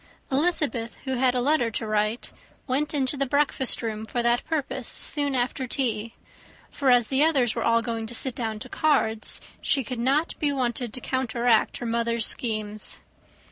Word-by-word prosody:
Elizabeth, 275 Hz, -6 st, +1 dB
who 265 Hz, -, -2 dB
had 255 Hz, 0 st, +3 dB
a 250 Hz, -, +2 dB
letter 255 Hz, -3 st, +2 dB
to 225 Hz, 0 st, -4 dB
write, 215 Hz, +2 st, -1 dB, 0.3 s
went 285 Hz, +3 st, 0 dB
into 275 Hz, -2 st, 0 dB
the 275 Hz, 0 st, 0 dB
breakfast 275 Hz, -2 st, +2 dB
room 220 Hz, -1 st, -3 dB
for 240 Hz, +2 st, -2 dB
that 235 Hz, 0 st, +2 dB
purpose 265 Hz, -5 st, -3 dB
soon 285 Hz, -2 st, -2 dB
after 250 Hz, +1 st, -1 dB
tea; 230 Hz, -3 st, -1 dB, 0.6 s
for 275 Hz, -2 st, 0 dB
as 245 Hz, -3 st, +5 dB
the 270 Hz, +2 st, +3 dB
others 270 Hz, -8 st, +3 dB
were -, -, -3 dB
all 230 Hz, 0 st, +3 dB
going 225 Hz, -1 st, -3 dB
to 240 Hz, -, -5 dB
sit 260 Hz, +2 st, +1 dB
down 225 Hz, -3 st, -3 dB
to 215 Hz, -, -8 dB
cards, 225 Hz, -7 st, +2 dB, 0.2 s
she 270 Hz, -, +1 dB
could 245 Hz, +1 st, -5 dB
not 275 Hz, +7 st, +1 dB
be 295 Hz, -2 st, +2 dB
wanted 245 Hz, -3 st, -1 dB
to 255 Hz, -, -7 dB
counteract 240 Hz, -3 st, +1 dB
her 245 Hz, -, -6 dB
mother's 235 Hz, 0 st, 0 dB
schemes. 215 Hz, -3 st, -1 dB
245 Hz, 180 wpm, -25 LUFS, 230-270 Hz, 0.6 s, as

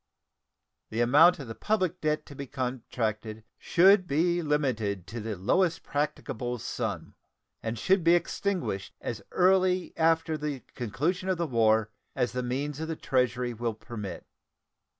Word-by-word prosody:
The 110 Hz, +2 st, -1 dB
amount 150 Hz, +9 st, +6 dB
of 135 Hz, -5 st, -8 dB
the 115 Hz, -, -5 dB
public 185 Hz, -, -1 dB
debt 155 Hz, 0 st, 0 dB
to -, -, -11 dB
be 140 Hz, 0 st, -6 dB
contracted 115 Hz, -4 st, -3 dB, 0.2 s
should 185 Hz, +1 st, +5 dB
be 170 Hz, +4 st, +2 dB
limited 120 Hz, -, 0 dB
to 115 Hz, +6 st, -6 dB
the 110 Hz, -1 st, -4 dB
lowest 165 Hz, -, +1 dB
practicable 130 Hz, -4 st, -2 dB
sum, -, -, -4 dB, 0.5 s
and 115 Hz, +1 st, -3 dB
should 185 Hz, -, +2 dB
be 170 Hz, +1 st, +6 dB
extinguished 175 Hz, -, -2 dB
as -, -, -5 dB
early 185 Hz, 0 st, +3 dB
after 160 Hz, -1 st, +2 dB
the 150 Hz, -3 st, -3 dB
conclusion 155 Hz, -, -2 dB
of 185 Hz, -, +1 dB
the 170 Hz, -, 0 dB
war 110 Hz, -5 st, +2 dB, 0.2 s
as 125 Hz, -, 0 dB
the 125 Hz, +1 st, -2 dB
means 135 Hz, +4 st, -3 dB
of 160 Hz, -, -3 dB
the 160 Hz, -, -3 dB
Treasury 125 Hz, -3 st, 0 dB
will 115 Hz, -1 st, -3 dB
permit. 105 Hz, -3 st, -7 dB
140 Hz, 150 wpm, -28 LUFS, 115-170 Hz, 0.5 s, amount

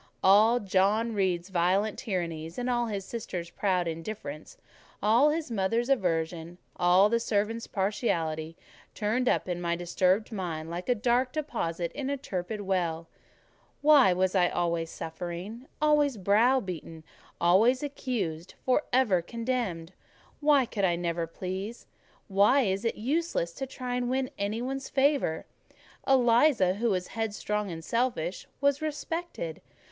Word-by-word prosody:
All 215 Hz, +5 st, +6 dB
John 205 Hz, +3 st, +1 dB
Reed's 185 Hz, -3 st, 0 dB
violent 190 Hz, +4 st, +1 dB
tyrannies, 165 Hz, -5 st, -4 dB
all 245 Hz, -1 st, 0 dB
his 200 Hz, -3 st, -4 dB
sisters' 180 Hz, -7 st, -5 dB
proud 185 Hz, -4 st, 0 dB
indifference, 165 Hz, -2 st, -6 dB, 0.4 s
all 230 Hz, +8 st, +4 dB
his 305 Hz, -3 st, -2 dB
mother's 230 Hz, +4 st, 0 dB
aversion, 170 Hz, -7 st, -1 dB, 0.2 s
all 180 Hz, +3 st, +5 dB
the 230 Hz, +2 st, +1 dB
servants' 225 Hz, +1 st, -1 dB
partiality, 165 Hz, -6 st, -1 dB, 0.4 s
turned 225 Hz, +4 st, 0 dB
up -, -, +1 dB
in 175 Hz, -1 st, -3 dB
my 170 Hz, -1 st, 0 dB
disturbed 185 Hz, +5 st, +1 dB
mind 165 Hz, -6 st, -4 dB
like 175 Hz, +6 st, -5 dB
a 245 Hz, -, +4 dB
dark 245 Hz, +3 st, +1 dB
deposit 180 Hz, -, -3 dB
in 275 Hz, -1 st, -4 dB
a 280 Hz, -, -1 dB
turbid 205 Hz, -4 st, -4 dB
well. 170 Hz, -4 st, -1 dB, 0.7 s
Why 290 Hz, -9 st, +7 dB
was 185 Hz, +1 st, +1 dB
I 180 Hz, -3 st, +3 dB
always 170 Hz, -1 st, -1 dB
suffering, 175 Hz, -, -6 dB
always 295 Hz, -4 st, +3 dB
browbeaten, 200 Hz, -, +1 dB, 0.4 s
always 220 Hz, -, +4 dB
accused, 210 Hz, -, -4 dB
for 255 Hz, +2 st, +3 dB
ever 235 Hz, -9 st, +3 dB
condemned? 225 Hz, -5 st, -3 dB, 0.5 s
Why 290 Hz, -3 st, +4 dB
could 210 Hz, -3 st, -4 dB
I 175 Hz, -2 st, +3 dB
never 170 Hz, -1 st, -2 dB
please? 190 Hz, +6 st, -6 dB, 0.4 s
Why 205 Hz, +4 st, +4 dB
was 195 Hz, +4 st, -3 dB
it 230 Hz, -, 0 dB
useless 260 Hz, -, -1 dB
to 270 Hz, +6 st, -5 dB
try 250 Hz, -1 st, -4 dB
to 245 Hz, -, -1 dB
win 260 Hz, +1 st, -1 dB
any 210 Hz, +4 st, -2 dB
one's 270 Hz, +1 st, -4 dB
favour? 275 Hz, -, +1 dB, 0.6 s
Eliza, 240 Hz, -5 st, +4 dB
who 230 Hz, +4 st, 0 dB
was 185 Hz, -3 st, -1 dB
headstrong 210 Hz, -2 st, -2 dB
and 165 Hz, -1 st, -7 dB
selfish, 230 Hz, -8 st, -1 dB
was 280 Hz, 0 st, +2 dB
respected. 310 Hz, -, -4 dB
205 Hz, 135 wpm, -28 LUFS, 175-245 Hz, 0.7 s, Why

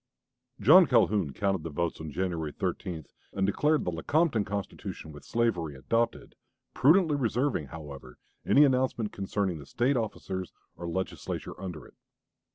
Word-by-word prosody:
John 155 Hz, -, +8 dB
Calhoun 105 Hz, -, +3 dB
counted 95 Hz, +4 st, 0 dB
the 80 Hz, -, -5 dB
votes 85 Hz, +1 st, -2 dB
on 80 Hz, -, -5 dB
January 80 Hz, -1 st, -2 dB
13 80 Hz, +1 st, -4 dB, 0.3 s
and 95 Hz, -1 st, +1 dB
declared 150 Hz, +10 st, +2 dB
the 90 Hz, -, 0 dB
"Lecompton 120 Hz, -, +1 dB
Constitution 95 Hz, -5 st, -5 dB
with 75 Hz, -, -12 dB
slavery" 90 Hz, -11 st, 0 dB
adopted, 115 Hz, -, -1 dB, 0.4 s
prudently 160 Hz, +3 st, +4 dB
reserving, 125 Hz, -, 0 dB
however, 70 Hz, -4 st, -10 dB, 0.3 s
any 145 Hz, -, +6 dB
announcement 130 Hz, -5 st, 0 dB
concerning 95 Hz, -3 st, -2 dB
the 70 Hz, -, -10 dB
State 130 Hz, +4 st, +1 dB
officers 95 Hz, -4 st, -4 dB, 0.2 s
or 85 Hz, +2 st, -6 dB
Legislature 95 Hz, +2 st, -4 dB
under 90 Hz, -5 st, -6 dB
it. -, -, -17 dB
95 Hz, 140 wpm, -29 LUFS, 80-120 Hz, 0.4 s, John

